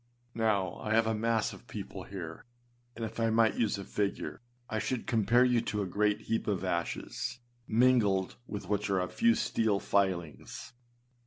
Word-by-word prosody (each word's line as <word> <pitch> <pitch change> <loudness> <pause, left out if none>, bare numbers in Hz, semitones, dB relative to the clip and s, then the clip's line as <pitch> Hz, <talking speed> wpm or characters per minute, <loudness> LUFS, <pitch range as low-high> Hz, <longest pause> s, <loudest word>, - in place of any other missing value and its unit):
Now, 105 -6 +1
I 110 0 0
have 115 0 +4
a 110 - +1
mass 115 0 +1
of - - -13
people - - -7
here; 85 -5 -7 0.5
and 115 - -3
if 110 +1 -7
I 115 0 +3
might 110 -1 +4
use 110 -3 +2
a 100 - -5
figure, 100 +3 -2 0.3
I 110 - -2
should 125 +2 -2
compare 115 +2 +4
you 125 -2 +3
to 105 -2 -2
a - - -2
great 105 +3 +1
heap 115 +1 -2
of 100 -3 0
ashes, 85 +5 -2 0.3
mingled 110 -5 +3
with 105 - -5
which 105 0 0
are 95 -1 +2
a 90 - 0
few 235 - +3
steel 110 -3 +1
filings. 90 -8 -1
105 Hz, 175 wpm, -31 LUFS, 100-115 Hz, 0.5 s, have